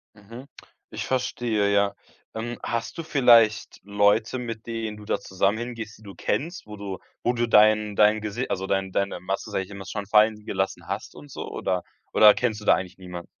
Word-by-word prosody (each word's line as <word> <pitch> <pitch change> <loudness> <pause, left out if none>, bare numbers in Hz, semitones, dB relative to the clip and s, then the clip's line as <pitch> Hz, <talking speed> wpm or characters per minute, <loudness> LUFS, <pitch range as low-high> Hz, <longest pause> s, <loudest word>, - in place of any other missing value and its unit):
Mhm. 115 +6 -12 0.4
Ich - - -4
verstehe, 115 -5 0
ja. 100 0 +2 0.4
Ähm, 120 +2 -4
hast 115 +7 -3
du 165 - -4
vielleicht 115 -8 +4
Leute, 105 +4 +2
mit 115 -2 -6
denen 115 -2 -4
du 105 - -12
da - - -1
zusammen 95 +3 0
hingehst, 115 -3 -6
die 110 - -19
du 100 -1 -11
kennst? 170 +1 -2
Wo 105 0 -9
du 100 -2 -6 0.2
wo 120 - +2
du 120 0 0
dein 105 -1 +4
dein 105 0 +4
Gesi 110 +4 -3
also, 95 - -2
dein 95 -1 -1
deine 100 -2 -1
Maske 95 +2 -4
immer 100 0 -10
schon 100 +1 -5
fallen 105 0 +3
gelassen 95 0 -2
hast - - -5
und 75 -1 -13
so? - - -7
Oder 90 -1 -2 0.3
oder 105 -1 +8
kennst 110 -4 -1
du - - -10
da - - +6
eigentlich 90 0 -6
niemand? 90 -2 -8
105 Hz, 195 wpm, -25 LUFS, 100-115 Hz, 0.4 s, oder